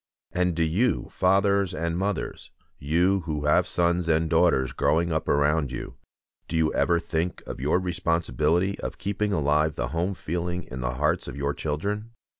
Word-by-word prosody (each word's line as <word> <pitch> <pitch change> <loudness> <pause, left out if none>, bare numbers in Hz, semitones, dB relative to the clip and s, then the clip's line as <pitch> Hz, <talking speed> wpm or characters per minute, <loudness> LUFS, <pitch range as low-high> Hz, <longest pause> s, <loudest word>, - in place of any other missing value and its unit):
And 90 -1 0
do 85 - +1
you, 100 +10 +1
fathers 100 0 +2
and 85 0 -2
mothers, 95 +1 -3 0.3
you 85 +7 +2
who 75 -2 -2
have 75 - +3
sons 85 0 +1
and 80 0 +2
daughters 80 -7 +3
growing 85 +5 +1
up 80 -1 -1
around 75 -1 +2
you, 65 - -6 0.5
do 85 - -4
you 80 -1 +2
ever 85 0 +2
think 85 +1 -3
of - - -7
your 75 +6 +2
responsibility 85 0 0
of - - -5
keeping 105 +1 -1
alive 75 -2 +2
the - - -2
home 85 +5 -1
feeling 90 +2 -3
in 65 0 -7
the 60 0 -2
hearts 75 +2 0
of - - -7
your 70 0 -1
children? 100 +11 -3
85 Hz, 170 wpm, -26 LUFS, 75-90 Hz, 0.5 s, have